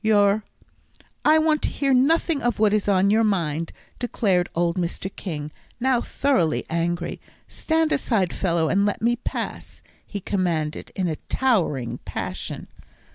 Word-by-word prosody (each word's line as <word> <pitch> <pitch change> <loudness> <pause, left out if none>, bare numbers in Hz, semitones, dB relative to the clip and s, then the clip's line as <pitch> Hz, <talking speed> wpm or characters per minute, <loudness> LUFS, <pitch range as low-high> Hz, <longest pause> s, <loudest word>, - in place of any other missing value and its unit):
Your 205 -1 +4 0.4
" - - -38 0.3
"I 310 +1 +6
want 310 -1 +2
to - - 0
hear 275 -1 0
nothing 295 +4 +3
of 240 0 0
what 210 -1 +3
is 210 -1 +1
on 195 0 +4
your 220 +2 +4
mind," 165 -6 0 0.3
declared 195 -7 +1
old 170 0 +1
Mr. 180 +2 -3
King, 150 -5 -5 0.3
now 250 -1 +2
thoroughly 255 - +1
angry. 170 +1 -2 0.3
"Stand 320 -1 0
aside, 205 -10 +1
fellow, 170 -4 +1
and 200 +5 +2
let 205 +1 -1
me 240 +1 +3
pass," - - -5 0.2
he 205 - -6
commanded, 170 -6 -2
in 185 -2 0
a 155 -2 -2
towering 175 - +1
passion. - - -5
200 Hz, 150 wpm, -24 LUFS, 170-240 Hz, 0.4 s, I